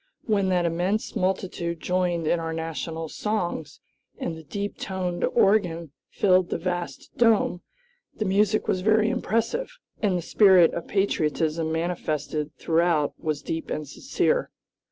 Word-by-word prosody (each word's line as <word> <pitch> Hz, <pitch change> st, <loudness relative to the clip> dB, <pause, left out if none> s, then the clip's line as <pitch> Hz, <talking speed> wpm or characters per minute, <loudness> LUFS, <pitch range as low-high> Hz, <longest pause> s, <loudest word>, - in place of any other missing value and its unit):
When 200 Hz, -4 st, +1 dB
that 180 Hz, -2 st, +2 dB
immense 180 Hz, +6 st, -1 dB
multitude 180 Hz, -3 st, -1 dB
joined 180 Hz, -2 st, 0 dB
in 170 Hz, +2 st, +2 dB
our 165 Hz, 0 st, -3 dB
national 165 Hz, 0 st, -4 dB
songs, 175 Hz, -6 st, -3 dB, 0.4 s
and 165 Hz, -, -3 dB
the 160 Hz, -, -9 dB
deep 200 Hz, +7 st, -5 dB
toned 180 Hz, -2 st, -3 dB
organ 170 Hz, -6 st, +2 dB, 0.2 s
filled 185 Hz, -2 st, +3 dB
the -, -, -1 dB
vast 175 Hz, -5 st, -4 dB
dome 225 Hz, -7 st, +3 dB, 0.6 s
the 215 Hz, -, -1 dB
music 205 Hz, +2 st, +2 dB
was 185 Hz, -, +1 dB
very 215 Hz, +2 st, +3 dB
impressive, 250 Hz, -, -1 dB, 0.2 s
and 195 Hz, -4 st, +2 dB
the 175 Hz, -, -4 dB
spirit 185 Hz, -3 st, +6 dB
of 170 Hz, -, -5 dB
patriotism 160 Hz, -4 st, 0 dB
manifested 160 Hz, -3 st, -2 dB
throughout 165 Hz, -3 st, +2 dB
was 150 Hz, -2 st, -2 dB
deep 165 Hz, 0 st, -4 dB
and 155 Hz, -1 st, -3 dB
sincere. 380 Hz, -, 0 dB
175 Hz, 135 wpm, -25 LUFS, 165-200 Hz, 0.6 s, spirit